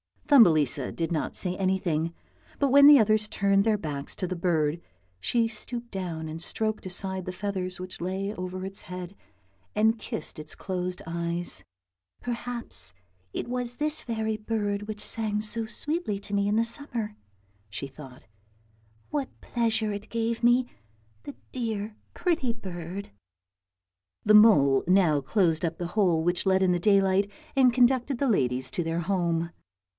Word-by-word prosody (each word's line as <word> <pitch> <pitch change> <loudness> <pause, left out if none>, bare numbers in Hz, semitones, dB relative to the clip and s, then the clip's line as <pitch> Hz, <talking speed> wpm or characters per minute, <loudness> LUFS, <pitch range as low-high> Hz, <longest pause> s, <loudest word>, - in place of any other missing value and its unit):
Thumbelisa 155 - +5
did 165 0 -2
not 160 - -2
say 180 -1 +2
anything, 175 -4 0 0.4
but 280 - +2
when 280 +2 +8
the 295 -1 +10
others 215 -2 +3
turned 200 -1 +2
their 220 -2 +3
backs 145 -6 -5
to - - -2
the 185 +1 -3
bird, 165 -3 +1 0.4
she 230 - +1
stooped 235 +2 -7
down 170 -5 -4
and 160 +1 -6
stroked 215 +4 -2
aside 190 0 -2
the 185 - -4
feathers 185 -1 -3
which 185 0 -8
lay 190 +3 -2
over 185 -1 -5
its 195 0 -8
head, 180 0 -7 0.6
and 220 +2 +3
kissed 155 - -5
its 150 0 -8
closed 180 -1 -4
eyes. 170 - -2 0.3
" 90 +1 -49
Perhaps 235 - -5 0.4
it - - -2
w 245 - -4
r - - 0
as 245 0 -5
this 300 +3 -1
very 220 -2 -2
bird 210 -2 -2
which 210 0 -6
sang 215 -2 0
so 225 +1 -1
sweetly 295 - -2
to 205 0 -9
me 200 0 +2
in 205 - +1
the 225 - +4
summer," 230 -3 -3 0.5
she 105 +6 -5
thought; 135 -2 -13 0.4
" 110 0 -35
what 285 -3 -3
pleasure 225 -2 0
it 205 +1 -6
gave 230 0 -1
me, 240 +1 +5 0.6
the 285 - -8 0.2
dear 220 -4 -3 0.2
pretty 330 -9 0
bird." 185 -3 -7 1.1
The 210 - +4
mole 170 -12 +6
now 180 -5 +4
closed 165 +2 +1
up 165 0 -2
the 175 - -3
hole 175 -6 +3
which 175 +3 0
let 190 0 +3
in 185 - +4
the 175 - +1
daylight 195 +1 +3 0.3
and 255 -3 +5
conducted 255 +1 +3
the 275 +1 +1
ladies 130 - +1
to 175 - -1
their 165 +1 -1
home. 170 -2 0
195 Hz, 165 wpm, -27 LUFS, 170-225 Hz, 1.1 s, the